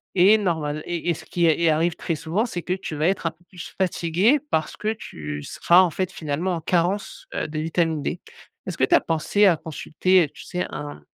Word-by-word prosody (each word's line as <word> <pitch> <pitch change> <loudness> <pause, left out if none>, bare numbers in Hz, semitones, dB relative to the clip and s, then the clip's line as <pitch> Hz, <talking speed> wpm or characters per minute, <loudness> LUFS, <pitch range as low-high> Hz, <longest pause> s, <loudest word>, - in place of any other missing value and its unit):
et 195 +4 +6
normal 160 -7 -1
et 175 0 -3
et - - +3
ce - - -11
qui 175 -1 0
est 160 -1 +3
est 170 - +4
arrive 160 +2 +2
très 165 - -2
souvent, 165 +8 -1
c'est 180 -8 -4
que 180 - -6
tu 185 -4 -5
vas 155 +2 +1
être 190 -2 -2
un - - -1
peu 165 +2 -29
plus 180 -3 -10
fatiguée, 185 - +2
parce 155 -1 -1
que 215 +1 -1
tu 75 - -7
seras 175 - +4
en 185 - +3
fait 185 +2 -2
finalement 160 +4 -2
en 165 - -5
carence, 180 +4 -1
heu, - - -1
de 155 0 -4
vitamine 160 -1 0
D. 170 - -3 0.5
Est-ce - - -4
que - - +3
t'as 340 - +4
pensé 165 +6 +2
à 175 -4 +4
consulter, 170 +4 +1
heu, - - -10
tu - - -13
sais, 180 0 -3
un 75 0 -7
170 Hz, 230 wpm, -23 LUFS, 155-185 Hz, 0.5 s, et